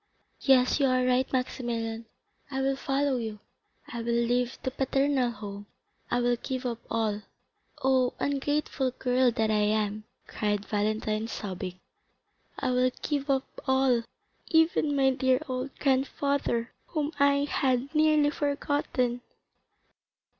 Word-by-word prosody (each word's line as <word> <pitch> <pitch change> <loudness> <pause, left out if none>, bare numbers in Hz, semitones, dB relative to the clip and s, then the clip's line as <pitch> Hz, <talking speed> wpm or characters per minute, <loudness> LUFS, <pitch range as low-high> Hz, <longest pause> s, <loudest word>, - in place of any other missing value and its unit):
Yes, 260 0 +4
you 275 - +4
are 255 -1 +2
right, 255 +1 +2
Maximilian, 230 -3 -2 0.4
I 265 -1 -3
will 270 0 +1
follow 275 0 0
you. 220 -3 -4 0.5
I 235 - -6
will 235 0 0
leave 245 +1 +1
the 260 - -1
paternal 270 -1 +1
home, 205 -3 -8 0.4
I 245 - +1
will 245 0 +2
give 260 +1 -4
up 235 -2 -2
all. 215 -2 0 0.6
Oh, 260 -1 +3
ungrateful 285 -1 0
girl 250 0 +3
that 220 -2 0
I 210 -1 +2
am," 210 0 0 0.2
cried 205 -1 -2
Valentine, 215 +1 -1
sobbing, 185 -4 -5 0.8
"I 260 -2 0
will 250 0 +3
give 285 -1 -1
up 270 -1 +2 0.2
all, 265 -2 +3 0.5
even 320 -3 +3
my 270 -1 +4
dear 260 0 +2
old 255 +1 -4
grandfather, 270 -3 0
whom 305 -2 -2
I 280 0 +4
had 265 0 0
nearly 305 -1 +4
forgotten." 285 -4 -1
255 Hz, 130 wpm, -28 LUFS, 230-275 Hz, 0.8 s, Yes